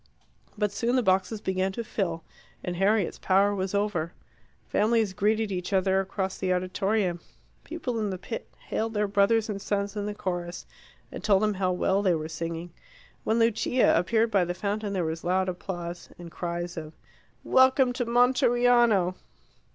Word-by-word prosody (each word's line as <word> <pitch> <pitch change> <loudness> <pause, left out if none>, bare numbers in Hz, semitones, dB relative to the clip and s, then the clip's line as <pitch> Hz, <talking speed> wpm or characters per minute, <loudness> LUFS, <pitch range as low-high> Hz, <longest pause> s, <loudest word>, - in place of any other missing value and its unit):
But 210 -1 0
soon 235 +5 0
the 255 - +2
boxes 190 +2 +1
began 190 -1 0
to 235 - -4
fill, 170 -7 -3 0.4
and 180 - -3
Harriet's 195 +1 +1
power 195 +2 +3
was 190 0 -2
over. 195 -5 -1 0.5
Families 220 -2 +2
greeted 215 +2 +1
each 180 +1 -3
other 190 0 +3
across 190 0 -3
the 185 -1 0
auditorium. 185 0 0 0.4
People 255 -8 -4
in 210 -2 -1
the 190 - -3
pit 225 +5 -7
hailed 225 0 -2
their 210 0 +1
brothers 205 +3 +3
and 200 -2 -4
sons 200 0 -2
in 205 -1 -3
the 210 - -4
chorus, 175 -3 -4 0.5
and - - -8
told 200 -1 +3
them 210 0 +2
how 185 -1 0
well 190 +2 +1
they 185 -4 +3
were 155 0 -4
singing. 165 +1 -5 0.5
When 220 - +1
Lucia 230 +2 +3
appeared 220 +6 +2
by 195 -3 +3
the 175 0 -3
fountain 205 +2 -2
there 180 -3 0
was 160 +1 -4
loud 185 +2 +1
applause, 175 -1 -5
and 170 -1 -10
cries 175 0 -4
of 155 -1 -6 0.5
"Welcome 260 -1 +4
to 245 0 -1
Monteriano!" 240 -5 +3
195 Hz, 165 wpm, -27 LUFS, 180-220 Hz, 0.5 s, Welcome